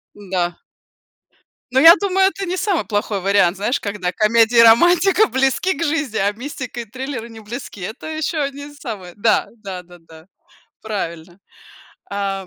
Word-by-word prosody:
Да. 180 -3 -3 1.2
Но 265 - +4
я 330 +3 +9
думаю, 385 -1 +2
это 390 0 -5
не 370 0 -3
самый 385 -4 0
плохой 205 -1 -2
вариант, 195 -2 +3
знаешь, 225 +7 -1
когда 200 -3 -3
комедия 230 +2 +3
и 230 - +9
романтика 350 - +5
близки 270 +7 +1
к - - -5
жизни, 300 -7 -1
а 200 +1 +2
мистика 250 +1 -7
и - - -9
триллеры 245 0 -6
не 225 - -11
близки, 215 -1 -8
это 220 +11 -7
еще 315 +1 -3
одни 285 +1 -5
самые 210 -11 -8
да 215 +2 +2
да 195 -4 -7
да 175 0 -16
да, 160 0 -17 0.6
правильно. 175 -4 -6 0.7
А, 195 -1 -3
230 Hz, 160 wpm, -19 LUFS, 200-290 Hz, 1.2 s, я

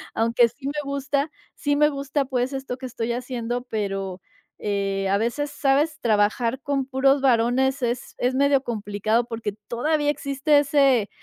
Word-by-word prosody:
Aunque 230 +1 +4
sí 270 +4 -9
me 285 - -2
gusta. 280 +1 -1 0.2
Sí, 290 -1 0
me 300 0 +5
gusta 280 0 -2
pues 255 0 -1
esto 265 -2 -4
que 260 - -8
estoy 235 -1 -3
haciendo, 245 -1 -3
pero, 195 -3 -3 0.4
eh, 195 -1 -1
a 200 - +3
veces, 255 +7 -1
¿sabes?, 290 +3 +1
trabajar 230 +3 +1
con 275 -2 -1
puros 270 +1 +2
varones 260 +2 +2
es 240 0 -2
es 250 +1 +1
medio 280 0 +3
complicado 215 0 -1
porque 230 -3 -4
todavía 295 +5 0
existe 285 +1 +2
ese 275 -6 +3
255 Hz, 155 wpm, -24 LUFS, 230-280 Hz, 0.4 s, me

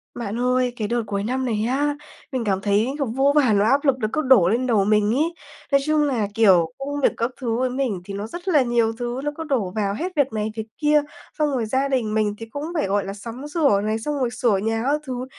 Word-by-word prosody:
Bạn 230 -1 -4
ơi, 250 0 +1
cái 215 -3 -3
đợt 240 +1 0
cuối 200 -1 -2
năm 255 +4 -1
này 220 -3 -1
á, 290 +2 0 0.4
mình 260 -3 -2
cảm 195 -3 0
thấy, 205 +3 +2
kiểu, 280 - 0
vô 270 +4 +2
vàn 255 -8 +4
nỗi 205 +2 +3
áp 280 +5 +2
lực 275 -2 +4
nó 215 - 0
cứ - - +1
đổ 255 - +5
lên 245 +5 0
đầu 215 -5 +3
mình 210 +1 +3
ấy, 320 +5 +1 0.4
nói 275 0 +4
chung 305 0 +2
là, 250 -8 0
kiểu, 185 -7 +4
công 285 +1 -4
việc - - +4
các 230 +2 -1
thứ 230 -3 -1
với 255 +1 0
mình 250 -7 -2
thì 200 - -7
nó 200 +2 -4
rất 345 +9 -9
là 310 -6 +4
nhiều 235 -2 +1
thứ, 240 +2 -4
nó 295 - -1
cứ 325 - -4
đổ 250 -12 -1
vào 200 -2 0
hết 350 - -4
việc 280 -5 +1
này, 215 0 -2
việc 220 -1 -5
kia, 300 -1 +3 0.4
xong 300 -1 +2
rồi 250 -4 -1
gia 265 +5 0
đình 250 -6 -1
mình 215 -1 +1
thì 225 - -7
cũng 285 +6 -7
phải, 305 - 0
gọi 200 +1 0
là, 195 - -5
sắm 235 +7 -8
sửa 295 - +2
này, 215 +2 -1
xong 295 +4 -3
rồi 250 -2 +1
sửa 235 -3 +1
nhà 225 +3 -1
các 290 +4 +1
thứ 255 -1 -4
240 Hz, 265 wpm, -22 LUFS, 215-275 Hz, 0.4 s, đổ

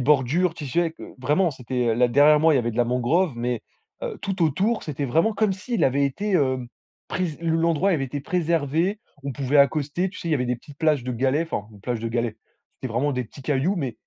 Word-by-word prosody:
bordures, 150 +6 +2
tu 150 - -6
sais, 170 +5 +1
que - - -12
vraiment, 150 +8 +2
c'était 125 -2 -3
heu, 115 - +2
là 125 +2 +3
derrière 145 +5 +6
moi, 160 +1 +5
il - - +4
y - - +4
avait 120 -1 0
de 110 - -8
la 120 - +3
mangrove, 125 +9 +1
mais 120 -1 -2 0.4
heu - - -4
tout 195 -2 -2
autour, 195 - +1
c'était 145 -2 -3
vraiment 165 - +2
comme 215 -1 +1
s'il 225 +5 -3
avait 140 +2 +3
été, 200 +10 -2
hem, 130 -7 +1 0.4
prèse 175 -5 -2
le 165 -1 +1
l'endroit 165 +3 +2
avait 155 -7 +1
été 140 +2 -5
préservé. 165 +4 0 0.2
On 140 0 -4
pouvait 135 +2 0
accoster, 145 +6 +2
tu 195 - -10
sais, 170 - -5
il - - 0
y - - +5
avait 125 -3 0
des 125 0 -1
petites 140 +4 -15
plages 155 -5 +2
de 125 - -2
galets, 135 +6 +1
enfin 105 - -3
une 105 - -15
plage 120 +2 -3
de 115 - -2
galets, 115 -1 -2 0.4
c'était 130 -4 -6
vraiment 140 +5 +1
des 125 -1 -2
petits 135 +5 -13
cailloux 145 +8 +1
mais 135 -8 -2
145 Hz, 245 wpm, -24 LUFS, 125-170 Hz, 0.4 s, derrière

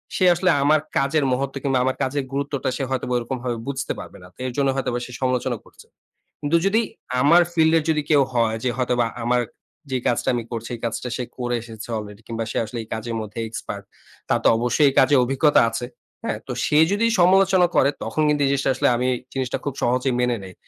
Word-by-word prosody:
সে 185 - +2
আসলে 185 +2 +1
আমার 155 +2 +4 0.2
কাজের 140 +2 +2
মহত্ত্ব 135 +1 -2
কিংবা 135 -2 +1
আমার 130 - 0
কাজের 140 +2 -1
গুরুত্বটা, 140 -1 -2
সে 140 - -2
হয়তোবা 125 -1 -2
ওইরকমভাবে 120 0 -3
বুঝতে 140 0 -2
পারবে - - -10
না। - - -12
তো - - -31
এর - - -3
জন্য 140 -1 +2
হয়তোবা 125 -2 -1
সে - - -11
সমালোচনা 130 -1 0
করছে। - - -17 0.6
কিন্তু 150 +3 +2
যদি 215 +4 +3 0.4
আমার 165 +5 +6
ফিল্ডের 160 -1 +4
যদি 155 -1 +2
কেউ 145 -3 +5
হয় 115 -2 +2
যে, 130 - +1
হয়তোবা 125 -2 +1 0.2
আমার 125 +1 +2 0.5
যে 130 - +1
কাজটা 120 - +1
আমি 120 - -2
করছি, 115 -1 -5
এই - - -11
কাজটা 115 +2 -3
সে 125 - -2
করে 120 -1 -1
এসেছে 110 -1 -10
অলরেডি 105 0 -8
কিংবা 115 -1 -3
সে - - -3
আসলে 115 +2 -6
এই - - -16
কাজের 115 +1 -4
মধ্যে 110 +1 -7
এক্সপার্ট। 110 - -6 0.5
তার - - +3
তো - - +5
অবশ্যই 125 +5 +2
এই - - -5
কাজে 135 +2 +5
অভিজ্ঞতা 135 +4 +3
আছে। 115 +2 -3 0.4
হ্যাঁ? - - -2
তো, - - -4
সে 150 - +2
যদি 205 +3 +2
সমালোচনা 185 0 +5
করে, 140 - +5
তখন 155 - -2
কিন্তু 150 -1 +1
এই - - +2
জিনিসটা 140 -1 +1
আসলে, - - +2
আমি 125 +1 0 0.3
জিনিসটা 130 -2 -2
খুব 145 - -2
সহজেই 125 +2 +1
মেনে 125 -1 +1
নেই। 95 -1 -10
130 Hz, 210 wpm, -22 LUFS, 120-145 Hz, 0.6 s, আমার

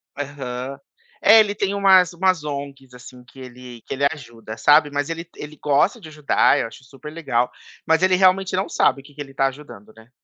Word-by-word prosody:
Aham, 135 -2 -6 0.4
é, 220 +1 +7
ele 205 -2 +2
tem 200 0 -2
umas 190 -3 +4
umas 180 -2 0
ONGs 140 -3 -7
assim 125 0 -14
que 130 +2 -18
ele 125 -2 -12
que - - -7
ele 140 +1 -1
ajuda, 115 -7 -10
sabe. 145 +3 +4
Mas 145 +1 -3
ele, 165 +1 -6
ele 150 +1 -9
gosta 150 - +1
de 170 - -12
ajudar, 150 -1 +2
eu 115 - -2
acho 120 - -15
super 135 +3 -12
legal, 125 -7 -1 0.3
mas 160 +2 +2
ele 185 0 +4
realmente 185 0 +2
não 190 +1 -2
sabe 135 - +1
o - - -27
que 145 +1 -18
que 145 - -8
ele 135 -1 -9
está 135 0 0
ajudando, 135 -7 -10
né. 110 +1 -18
145 Hz, 210 wpm, -21 LUFS, 130-170 Hz, 0.4 s, é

